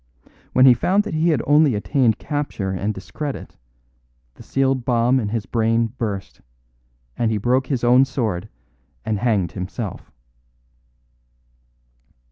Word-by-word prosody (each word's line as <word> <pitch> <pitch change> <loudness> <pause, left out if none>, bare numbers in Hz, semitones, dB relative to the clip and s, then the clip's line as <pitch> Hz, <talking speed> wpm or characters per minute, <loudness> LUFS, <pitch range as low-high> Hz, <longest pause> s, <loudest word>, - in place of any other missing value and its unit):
When 130 - +6
he 130 - +9
found 190 - +1
that - - -6
he 160 +2 +2
had 150 -7 +1
only 145 -3 +4
attained 110 +3 +1
capture 145 -10 -3
and 95 +3 -2
discredit, 135 +9 -7 0.8
the - - -16
sealed 135 -2 0
bomb 120 +1 +2
in 105 -4 -2
his 110 -1 -3
brain 115 0 0
burst, 100 -6 -5 0.7
and 115 - 0
he 110 - 0
broke 125 +5 +1
his 130 -3 -2
own 125 +2 +5
sword 110 -8 -3 0.6
and 110 -2 -1
hanged 100 -7 +1
himself." 95 +4 -6
120 Hz, 130 wpm, -21 LUFS, 105-135 Hz, 0.8 s, he